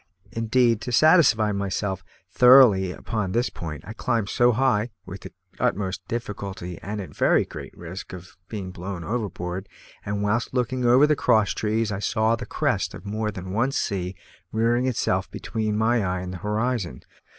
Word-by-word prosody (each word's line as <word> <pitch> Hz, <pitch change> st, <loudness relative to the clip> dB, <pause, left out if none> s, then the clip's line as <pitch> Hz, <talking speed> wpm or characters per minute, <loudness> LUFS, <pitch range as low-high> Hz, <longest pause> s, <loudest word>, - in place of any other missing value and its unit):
Indeed, 115 Hz, 0 st, +2 dB
to 125 Hz, -, -4 dB
satisfy 125 Hz, -6 st, +5 dB
myself 100 Hz, -1 st, -2 dB, 0.3 s
thoroughly 125 Hz, -7 st, +7 dB
upon 100 Hz, -1 st, -3 dB
this 120 Hz, +2 st, +1 dB
point 75 Hz, -3 st, -7 dB
I 110 Hz, -, -7 dB
climbed 115 Hz, -2 st, -1 dB
so 120 Hz, 0 st, +4 dB
high 120 Hz, -2 st, +1 dB, 0.2 s
(with -, -, -8 dB
the -, -, -9 dB, 0.3 s
utmost 95 Hz, -1 st, -1 dB
difficulty, 100 Hz, -6 st, -5 dB
and 105 Hz, +1 st, -5 dB
at 95 Hz, -, -8 dB
very -, -, +3 dB
great -, -, -10 dB
risk 90 Hz, +3 st, -8 dB
of 90 Hz, -1 st, -10 dB
being 100 Hz, -4 st, -6 dB
blown 90 Hz, 0 st, -6 dB
overboard), 95 Hz, -3 st, -4 dB, 0.3 s
and 100 Hz, 0 st, -2 dB
whilst 115 Hz, +5 st, -1 dB
looking 125 Hz, 0 st, 0 dB
over 125 Hz, +4 st, +6 dB
the 150 Hz, 0 st, +3 dB
cross 110 Hz, -6 st, +3 dB
trees, 110 Hz, 0 st, -1 dB
I 100 Hz, -, -3 dB
saw 110 Hz, +2 st, +1 dB
the 120 Hz, -1 st, -8 dB
crest -, -, -1 dB
of -, -, -11 dB
more 105 Hz, +1 st, -2 dB
than 95 Hz, -2 st, -7 dB
one 120 Hz, +6 st, +1 dB
sea 95 Hz, -5 st, -2 dB, 0.4 s
rearing 120 Hz, +3 st, +1 dB
itself 125 Hz, -, 0 dB
between 110 Hz, -2 st, -3 dB
my 115 Hz, +1 st, +2 dB
eye 90 Hz, -1 st, -1 dB
and 90 Hz, 0 st, -6 dB
the -, -, -5 dB
horizon. 105 Hz, -, -2 dB
105 Hz, 170 wpm, -24 LUFS, 95-120 Hz, 0.4 s, thoroughly